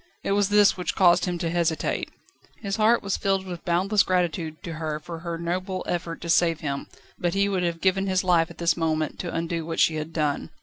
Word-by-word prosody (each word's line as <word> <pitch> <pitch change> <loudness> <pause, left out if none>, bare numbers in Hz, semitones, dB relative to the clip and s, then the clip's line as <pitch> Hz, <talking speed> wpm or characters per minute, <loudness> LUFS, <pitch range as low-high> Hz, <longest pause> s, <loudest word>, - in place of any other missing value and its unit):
It - - -1
was 200 0 +2
this 205 -1 +5
which 180 - -3
caused 175 -2 +5
him 180 -1 -2
to 170 -1 -2
hesitate. 165 -3 -1 0.5
His 200 0 -2
heart 225 +2 +3
was 200 -1 -1
filled 195 -1 0
with 175 -2 -7
boundless 190 +4 +2
gratitude 175 -3 -1
to 170 -4 -5
her 155 -1 -2
for 165 +1 -8
her 170 0 -4
noble 185 +3 -3
effort 170 -1 -3
to 170 - -6
save 165 -1 +3
him, 140 -2 -3 0.3
but 175 0 -1
he 200 0 +3
would 195 -2 0
have 170 -1 -2
given 195 +1 +2
his 185 0 +1
life 170 -3 +3
at - - -12
this 170 -1 +2
moment, 155 -2 -1
to 175 - -4
undo 165 0 -2
what 165 +1 -4
she 155 - +3
had 155 +1 -5
done. 150 -3 -1
175 Hz, 225 wpm, -25 LUFS, 165-190 Hz, 0.5 s, this